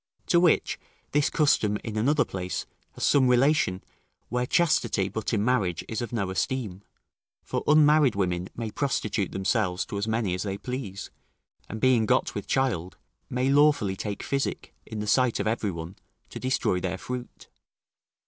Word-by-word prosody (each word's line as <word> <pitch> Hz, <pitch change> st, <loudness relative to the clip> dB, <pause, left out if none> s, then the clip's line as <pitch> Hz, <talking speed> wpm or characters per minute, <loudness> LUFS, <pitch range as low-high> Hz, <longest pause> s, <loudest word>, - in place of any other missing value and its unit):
To 170 Hz, -, +5 dB
which, 175 Hz, -2 st, +2 dB, 0.3 s
this 145 Hz, 0 st, +2 dB
custom, 110 Hz, -9 st, +2 dB
in 110 Hz, -, -5 dB
another 145 Hz, +8 st, +2 dB
place, 90 Hz, -1 st, -4 dB, 0.3 s
has -, -, -6 dB
some 135 Hz, -3 st, +4 dB
relation, 125 Hz, -7 st, +2 dB, 0.5 s
where 125 Hz, 0 st, -1 dB
chastity, 125 Hz, -, +2 dB
but 110 Hz, +2 st, -3 dB
in 105 Hz, -2 st, +1 dB
marriage, 95 Hz, -9 st, 0 dB
is 110 Hz, -, -3 dB
of 120 Hz, -, -4 dB
no 100 Hz, -6 st, -2 dB
esteem, 105 Hz, -2 st, -2 dB, 0.6 s
for -, -, -3 dB
unmarried 150 Hz, -4 st, +5 dB
women 90 Hz, -2 st, -1 dB
may 115 Hz, -2 st, -4 dB
prostitute 105 Hz, -7 st, -1 dB
themselves 95 Hz, -1 st, 0 dB
to 100 Hz, -, -4 dB
as 100 Hz, -, -2 dB
many 110 Hz, -4 st, 0 dB
as 90 Hz, -, -2 dB
they 100 Hz, -1 st, -3 dB
please, 105 Hz, -4 st, -6 dB, 0.6 s
and 110 Hz, -, -5 dB
being 125 Hz, -4 st, +3 dB
got -, -, +2 dB
with -, -, -5 dB
child, 95 Hz, -10 st, -1 dB, 0.3 s
may 125 Hz, +2 st, 0 dB
lawfully 145 Hz, -9 st, +4 dB
take 100 Hz, +1 st, -5 dB
physic, 140 Hz, 0 st, -3 dB
in 110 Hz, -1 st, -5 dB
the -, -, -3 dB
sight 125 Hz, +2 st, +2 dB
of -, -, -1 dB
every 110 Hz, -1 st, 0 dB
one, 85 Hz, +1 st, -6 dB, 0.3 s
to -, -, -7 dB
destroy 130 Hz, -8 st, 0 dB
their 95 Hz, +1 st, -3 dB
fruit. 125 Hz, +4 st, -7 dB
110 Hz, 165 wpm, -26 LUFS, 95-130 Hz, 0.6 s, To